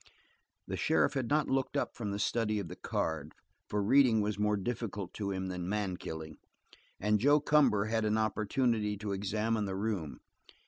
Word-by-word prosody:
The - - -3
sheriff - - +2
had 130 -4 -2
not 150 0 +2
looked 135 -1 0
up - - -1
from 105 -4 -4
the 100 - -2
study 110 +1 0
of 100 -5 -4
the 90 - -7
card, 80 -4 -3 0.4
for 105 -1 0
reading 125 0 +5
was 105 0 -1
more 105 0 +2
difficult 100 -3 -4
to 100 -2 -3
him 95 -1 -2
than 90 -1 -4
man 100 -3 -1
killing, 80 -2 -7 0.6
and 105 +1 +2
Joe 145 +6 +5
Cumber 135 -9 +3
had 110 0 0
an 110 0 +1
opportunity 110 0 0
to 105 0 -4
examine 105 +2 -1
the 95 -1 -3
room. 95 -7 -3
105 Hz, 180 wpm, -32 LUFS, 100-115 Hz, 0.6 s, reading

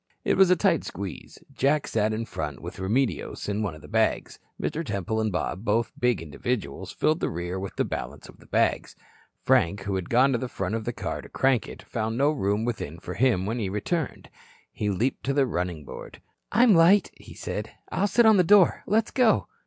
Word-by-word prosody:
It - - +3
was 190 -2 +5
a 180 - +6
tight 160 - +2
squeeze. 95 -1 -7 0.2
Jack 145 +2 +1
sat 110 -1 0
in 110 +1 -2
front 75 - -5
with - - -8
Remedios 115 +7 -1
and 105 +1 -1
one 90 -7 -3
of 75 - -14
the - - -11
bags. - - 0 0.2
Mr. 165 - -2
Temple 105 - -2
and 110 -1 0
Bob, 95 +2 -3
both 115 +1 +1
big 125 -9 +1
individuals, 80 - -4
filled 155 +2 +1
the - - -1
rear 90 +3 -4
with 95 0 -6
the - - 0
balance - - -6
of - - -16
the - - -18
bags. - - 0 0.5
Frank, 95 +4 +3
who 100 - -3
had 95 -2 -3
gone 130 +3 +4
to 120 - +1
the 130 - -3
front 95 -2 -3
of 110 -1 -3
the 120 - -1
car - - -4
to - - -13
crank 130 -3 +1
it, - - -10
found 110 0 -3
no 140 +3 +3
room 105 -5 0
within 110 -10 -4
for - - -7
him 115 -7 +2
when 115 +4 -2
he 100 -4 -2
returned. 130 - -3 0.4
He 105 - -2
leaped 115 +7 -1
to 135 0 0
the 140 -2 +4
running 90 - -3
board. - - -10 0.3
"I'm 235 +1 +5
light," 175 +4 +5
he - - -14
said. - - -5 0.2
"I'll 200 - +1
sit 235 +3 +4
on 220 -2 +7
the 180 - +5
door. 195 0 +5
Let's 220 +2 +1
go." 250 -4 +3
115 Hz, 215 wpm, -26 LUFS, 95-145 Hz, 0.5 s, on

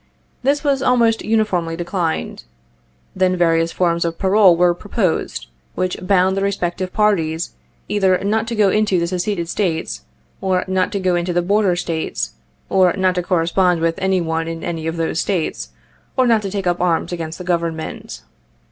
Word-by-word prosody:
This 280 +4 +1
was 280 -2 +1
almost 235 -4 +2
uniformly 195 -7 0
declined. 170 -1 -3 0.7
Then 185 -1 +2
various 165 -1 +2
forms 170 -1 +1
of 165 -1 -2
parole 190 -2 +5
were 175 0 +4
proposed, 190 -1 -2 0.3
which 185 0 -1
bound 185 0 +2
the 195 - -1
respective 185 -2 -2
parties 175 -7 0 0.3
either 190 -3 +2
not 220 +3 0
to 235 - -3
go 205 -3 +3
into 210 -2 +2
the 170 - 0
Seceded 180 0 -2
States, 160 - -2 0.4
or 185 -1 0
not 185 -1 0
to 200 - -1
go 185 -2 +1
into 175 +1 -1
the 175 0 +1
Border 200 0 +2
States, 165 -2 -3 0.4
or 185 -2 +3
not 190 -2 +1
to 180 - -1
correspond 180 0 +1
with 165 0 0
any 190 -1 +1
one 165 0 -2
in 165 0 -5
any 165 -2 -3
of 165 +1 -3
those 165 0 -1
States, 185 -6 -2 0.5
or 260 - +4
not 230 -3 +3
to 200 - -4
take 195 -1 -3
up 175 -1 0
arms 175 -1 +1
against 165 -2 -5
the 180 - -7
Government. 170 -2 -3
180 Hz, 175 wpm, -19 LUFS, 170-200 Hz, 0.7 s, parole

